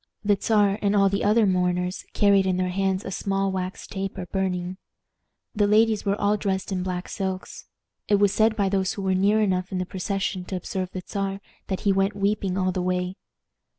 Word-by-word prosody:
The 205 0 +4
Czar 205 -2 +3
and 200 0 +2
all 195 -1 +5
the 200 +1 -1
other 215 +2 +4
mourners 180 0 0
carried 200 -2 +4
in 185 -1 +1
their 185 0 0
hands 190 0 0
a - - -4
small 195 +1 -1
wax 185 0 -4
taper 195 -2 -5
burning. 185 -1 -2 0.8
The 205 -3 +2
ladies 215 0 +3
were 200 +1 0
all 205 +1 +2
dressed 195 -1 -2
in 185 -1 -1
black 180 -1 -3
silks. 190 -1 -5 0.4
It 205 - +4
was 200 -1 +3
said 220 0 +3
by 200 -3 +1
those 190 -1 0
who 200 - -5
were 190 -1 +1
near 200 +3 +3
enough 185 -2 0
in 190 - -2
the 185 - -1
procession 190 0 -2
to 190 - -5
observe 185 +1 -3
the 185 -1 -6
Czar 195 -1 -2 0.3
that 190 - -3
he 200 - +3
went 195 +1 +1
weeping 200 -2 0
all 185 -1 +1
the 185 - -2
way. 180 0 -1
195 Hz, 205 wpm, -25 LUFS, 185-200 Hz, 0.8 s, all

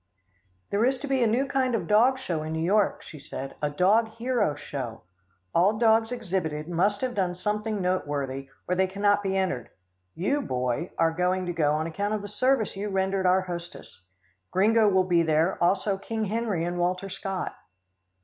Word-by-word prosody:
"There 205 +2 +2
is 260 +2 +2
to 285 - -4
be 270 -2 +1
a 235 - +4
new 240 +5 +2
kind 265 -3 0
of 225 - -1
a - - -8
dog 235 +5 +4
show 175 -12 -3
in 155 +1 -4
New 160 0 -1
York," 205 +3 +2
she 155 - -11
said, 135 0 -7
"a 150 - +1
dog 195 +9 +3
hero 230 - -1
show. 135 -6 -6 0.5
All 195 +5 +3
dogs 225 0 +3
exhibited 175 -10 -3
must 190 +4 +1
have 255 -1 -1
done 185 -5 0
something 210 +3 -2
noteworthy, 140 -7 -2 0.2
or 180 - +1
they 190 +1 +2
cannot 205 +2 +2
be 195 -1 -1
entered. 185 -10 -1 0.5
You, 275 - 0
Boy, 125 +4 -2
are 165 0 +2
to 180 +1 0
go 150 -3 +2
on 155 +1 0
account 200 +6 -2
of 210 - -4
the - - -5
service 225 +1 +1
you 205 +2 -3
rendered 190 -1 0
our 185 +1 +4
hostess. 175 - -8 0.5
Gringo 215 +3 +4
will 190 -1 +3
be 175 -2 +3
there, 160 +3 +1
also 195 +2 +1
King 220 +1 -3
Harry 210 -5 -1
and 175 0 -3
Walter 180 +2 0
Scott." 195 -1 -4
190 Hz, 190 wpm, -26 LUFS, 170-215 Hz, 0.5 s, a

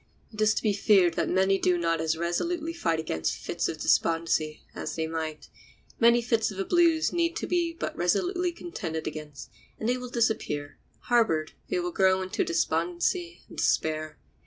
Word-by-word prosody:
It 215 - -5
is 215 0 +4
to - - -2
be 215 -2 +2
feared 195 -3 +4
that - - -1
many 190 +1 +3
do 180 -1 +2
not 165 -1 0
as 160 0 0
resolutely 320 - -1
fight 165 - 0
against 80 - -2
fits - - -2
of - - -4
despondency 165 -2 +1
as - - -5
they 160 - -1
might. 160 -1 -4 0.5
Many 235 0 +5
fits 225 -2 +1
of 200 - -8
the 195 - -1
blues 335 -2 +3
need 340 -1 +1
but - - -4
to - - -2
be 340 -2 0 0.2
resolutely 350 - 0
contended 175 - -5
against, 150 -5 -7 0.3
and 220 - -2
they 250 +1 +2
will 250 0 -7
disappear; 220 -12 -1 0.2
harbored, 220 -11 +2 0.2
they 375 - 0
will 355 0 -2
grow 190 - +3
into 185 - -1
despondency 175 - -1
and - - -13
despair. 155 -1 0
190 Hz, 180 wpm, -27 LUFS, 160-250 Hz, 0.5 s, Many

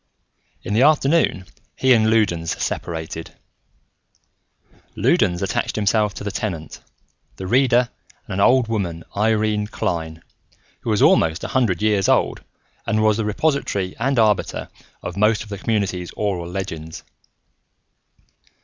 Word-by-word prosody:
In - - -3
the 110 - +3
afternoon, 145 - +3 0.3
he 130 -1 +4
and 110 -2 +3
Loudons 85 -7 +1
separated. 80 -1 -4 1.6
Loudons 90 +1 +2
attached 95 - -1
himself 105 -1 +1
to - - -7
the 100 - -3
Tenant, 85 -9 -5 0.6
the 95 - -7
Reader 125 +3 +3 0.4
and - - -7
an 95 - -2
old 125 +4 +4
woman, 90 -7 -3
Irene 105 0 +1
Klein, 80 -5 -3 0.6
who - - -5
was 105 -2 +2
almost 80 0 +3
a - - -4
hundred 110 -8 +1
years 105 -3 +2
old - - +2 0.5
and 110 0 +1
was 110 -1 +3
the 110 - -1
repository 105 -5 -1
and 135 +3 0
arbiter 110 -3 +1 0.3
of - - -6
most 105 +1 +2
of 110 - -14
the 100 -2 -6
community's 100 -6 -1
oral 95 -5 -2
legends. 80 -4 -6
105 Hz, 130 wpm, -21 LUFS, 90-110 Hz, 1.6 s, he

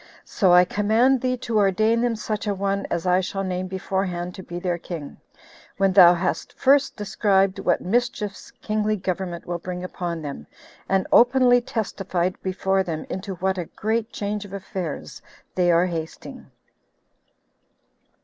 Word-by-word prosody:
"So 190 -4 +2
I 180 0 +7
command 225 +7 +2
thee 255 0 0
to 235 -3 -1
ordain 215 +4 +2
them 240 -1 +1
such 215 0 -4
a 205 - 0
one 200 +1 -1
as 170 - -2
I 180 +1 +3
shall 195 +1 -3
name 185 0 -3
beforehand 185 -1 -3
to 190 - -9
be 175 -1 -7
their 175 -1 -2
king, 165 -4 -7 0.6
when 195 -1 +2
thou 180 -2 +8
hast 180 +2 -2
first 275 +1 +3
described 195 -2 +1
what 175 - +1
mischiefs 210 -1 -2
kingly 215 0 0
government 185 -2 -4
will 175 0 -3
bring 180 +1 -6
upon 175 -3 -4
them, 140 - -7 0.4
and 190 -1 +2
openly 245 0 +5
testified 190 -6 -2
before 190 +1 0
them 165 -4 -4
into 190 0 -4
what 190 +1 -1
a 175 - -3
great 220 +5 -2
change 210 0 -3
of 200 -1 -12
affairs 185 -5 -6 0.3
they 180 -1 +2
are 170 +1 +4
hasting." 165 -3 -6
190 Hz, 155 wpm, -23 LUFS, 180-215 Hz, 0.6 s, thou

